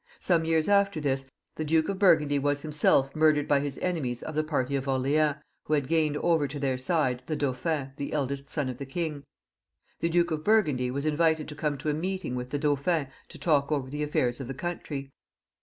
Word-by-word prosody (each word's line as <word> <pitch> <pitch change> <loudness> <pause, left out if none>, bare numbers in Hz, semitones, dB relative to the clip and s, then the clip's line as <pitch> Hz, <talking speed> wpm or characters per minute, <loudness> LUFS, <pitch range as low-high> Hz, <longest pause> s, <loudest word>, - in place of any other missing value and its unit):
Some 170 -3 +2
years 160 -1 +2
after 200 -4 +3
this, 135 -2 -1 0.3
the 155 - -1
Duke 160 +1 +2
of 195 -1 -3
Burgundy 150 -7 +4
was 145 0 0
himself 145 -3 +2
murdered 155 -2 +3
by 145 - +4
his 140 -1 -4
enemies 145 -10 -2
of 155 - -5
the 155 +1 +1
party 140 -3 -1
of 135 0 -2
Orleans, 140 +3 +2 0.3
who 155 - -1
had 140 -3 -1
gained 155 -2 +1
over 160 -3 +2
to 140 +2 -6
their 135 -2 0
side 130 -2 0
the 155 - -1
Dauphin, 140 0 -2
the 140 - -4
eldest 140 -1 -2
son 145 -4 -1
of 130 +1 -5
the 140 - -4
king. 150 -1 -3 0.8
The 170 - 0
Duke 175 0 +2
of 155 -1 -2
Burgundy 155 - +2
was 140 +3 -3
invited 160 0 +2
to 150 - -6
come 150 -1 -1
to 150 - -3
a - - -1
meeting 185 -2 -3
with 125 0 -4
the 145 - -1
Dauphin 145 +1 0 0.2
to - - -11
talk 145 -3 +2
over 135 -3 -1
the 150 +1 -4
affairs 125 -4 0
of 135 - -5
the 135 - -5
country. 145 -4 -5
150 Hz, 215 wpm, -28 LUFS, 135-160 Hz, 0.8 s, Burgundy